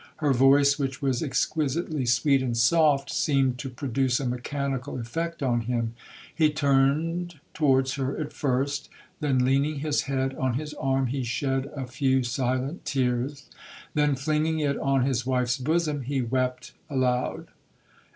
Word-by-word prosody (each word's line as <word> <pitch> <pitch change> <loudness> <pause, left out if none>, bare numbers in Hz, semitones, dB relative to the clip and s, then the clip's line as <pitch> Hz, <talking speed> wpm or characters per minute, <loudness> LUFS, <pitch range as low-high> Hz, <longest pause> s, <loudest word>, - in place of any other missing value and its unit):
Her 150 -3 +1
voice, 140 +3 +5
which 135 -2 -2
was 135 -3 0
exquisitely 150 0 -1
sweet 135 +3 +3
and 120 -3 -1
soft, 140 +2 +3
seemed 135 -4 +1
to 135 - -4
produce 130 0 0
a 140 - -3
mechanical 130 +1 -3
effect 165 +7 -4
on 120 -3 +1
him. 115 -1 -2 0.4
He 155 -2 +3
turned 150 +4 +1
towards 135 -4 +2
her 135 +1 -2
at 150 -1 -4
first,—then 140 0 -1
leaning 140 +4 +2
his 150 -1 +1
head 135 -1 0
on 130 -2 -1
his 150 +2 -4
arm, 135 -2 0
he 130 +2 -2
shed 135 +2 -1
a 135 -2 -4
few 130 +1 +1
silent 130 +5 -2
tears,—then 140 +3 -2
flinging 155 +3 0
it 145 -2 0
on 135 -2 +2
his 130 -3 0
wife's 125 0 +1
bosom, 155 +1 0
he 135 +2 -2
wept 125 +1 -1 0.2
aloud. 125 -3 -1
135 Hz, 140 wpm, -26 LUFS, 125-145 Hz, 0.4 s, voice